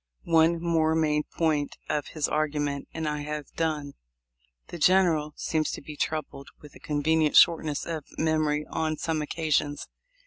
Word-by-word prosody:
One 165 0 +3
more 165 -2 +1
main 150 -2 +1
point 155 -3 0
of 150 -1 -1
his 155 -2 -2
argument 145 -2 -1
and 160 -1 -4
I 150 -1 -2
have 150 -1 -6
done. 150 -3 -2 0.8
The 175 - -7
General 165 -4 +3
seems 155 -1 -1
to - - -6
be 150 - -8
troubled 145 -2 -3
with 150 - -14
a - - -14
convenient 155 +1 +1
shortness 155 -3 +4
of 160 -3 -4
memory 155 -1 +1
on 155 -1 -1
some 160 0 -1
occasions. 150 -1 -1
155 Hz, 150 wpm, -27 LUFS, 150-160 Hz, 0.8 s, shortness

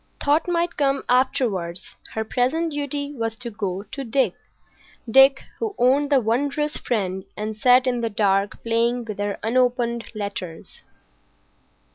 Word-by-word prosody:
Thought 295 +4 +2
might 345 -1 0
come 275 -1 +1
afterwards. 215 -9 0 0.2
Her 220 - -1
present 275 +9 0
duty 285 0 -3
was 225 -4 -3
to 235 0 -7
go 200 -2 -3
to 270 +7 -7
Dick,—Dick 270 +1 +1 0.2
who 435 -3 -3
owned 275 +4 +3
the 280 -2 +5
wondrous 280 +6 0
friend 190 -5 -2
and 215 +1 -3
sat 250 +3 +5
in 245 -2 0
the 230 - -1
dark 200 -1 0
playing 235 +1 +1
with 215 -3 -6
her 205 0 -2
unopened 240 0 +1
letters. 200 -5 -6
245 Hz, 135 wpm, -23 LUFS, 215-275 Hz, 0.2 s, the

